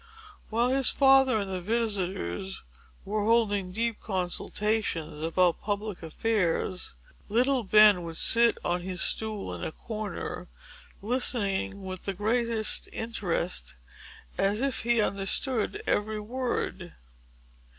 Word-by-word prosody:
While 235 +3 +1
his 265 0 +3
father 270 -3 +5
and 200 -2 -3
the 185 - -3
visitors 185 - -2 0.4
were 210 +1 -1
holding 205 -4 +2
deep 230 +2 -1
consultations 185 -3 -2
about 170 +2 +2
public 205 -1 -3
affairs, 180 - -1 0.3
little 250 +4 +2
Ben 210 -2 +6
would 165 -1 -6
sit 235 0 +5
on 175 +1 0
his 180 0 -5
stool 215 - -1
in 85 - -6
a - - -3
corner, 215 0 -6 0.6
listening 205 -4 0
with 185 -1 -7
the 195 - -2
greatest 225 +2 +1
interest, 185 - -3 0.6
as 205 +3 +2
if 270 -4 0
he 235 0 +1
understood 215 - 0
every 215 +1 0
word. 210 -6 -3
210 Hz, 115 wpm, -28 LUFS, 185-230 Hz, 0.6 s, Ben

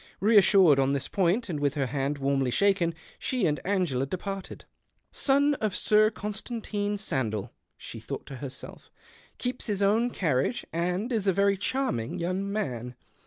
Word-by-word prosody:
Keassured 195 -7 +6
on 135 +1 +2
this 140 -1 -2
point, 195 +5 +1
and 160 -6 -3
with 145 -1 0
her 140 -2 0
hand 140 +2 -2
warmly 135 -1 0
shaken, 185 +2 +2 0.2
she 250 -6 0
and 150 -2 +1
Angela 175 -10 0
departed. 195 +4 -6 0.2
" - - -47
Son 285 +1 +3
of 215 -3 0
Sir 215 0 +4
Constantine 210 -1 -4
Sandell," 115 - -2 0.3
she - - -9
thought - - -6
to 135 - -8
herself, 130 0 -8 0.2
" - - -27
keeps 250 0 -4
his 205 -2 0
own 220 +5 +3
carriage, 160 - 0
and 180 +8 -1
is 210 -3 -1
a 190 - +4
very 200 +1 +3
charming 200 - -1
young 185 +3 -2
man. 125 - -3
190 Hz, 165 wpm, -27 LUFS, 140-210 Hz, 0.3 s, Keassured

